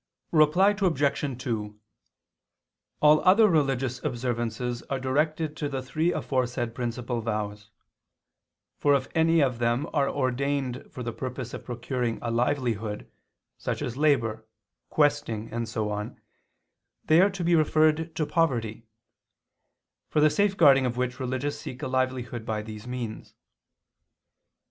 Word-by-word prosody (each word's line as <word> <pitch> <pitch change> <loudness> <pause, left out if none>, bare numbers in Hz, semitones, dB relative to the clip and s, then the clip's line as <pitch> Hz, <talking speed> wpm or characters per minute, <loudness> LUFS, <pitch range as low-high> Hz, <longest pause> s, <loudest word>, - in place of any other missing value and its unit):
Reply 165 +5 +5
Obj. 145 -6 0
2: 105 -5 -3 1.2
All 150 0 +6
other 215 +4 +6
religious 135 - 0
observances 120 -2 -2
are 135 - -1
directed 150 +4 0
to 145 - -2
the 135 -2 -3
three 155 +6 0
aforesaid 125 -5 -1
principal 120 0 -3
vows; 105 -2 -4 1.1
for 145 -1 +4
if 135 -1 -1
any 165 0 +4
of 125 -4 +1
them 120 +5 +1
are 140 -3 +2
ordained 135 -1 -1
for 125 - -7
the 120 -1 -4
purpose 125 -1 -5
of - - -7
procuring 120 -1 -2
a 120 - -1
livelihood, 115 -4 -1 0.5
such - - -3
as 120 - -4
labor, 120 -7 +1 0.5
questing, 145 -8 0
and 115 -1 -3
so 110 -1 -2
on, 105 0 -5 0.9
they 160 +3 +6
are 195 - +5
to 195 -2 -5
be 170 +1 +2
referred 155 0 +3
to 155 - 0
poverty; 115 -10 -1 1.2
for - - +1
the 150 0 +5
safeguarding 160 -10 +4
of 120 0 -4
which 125 0 -2
religious 130 +2 -3
seek 130 +3 -8
a - - -1
livelihood 130 -2 -2
by 110 -1 -3
these 110 +1 -9
means. 120 -3 -6
130 Hz, 135 wpm, -27 LUFS, 120-150 Hz, 1.2 s, All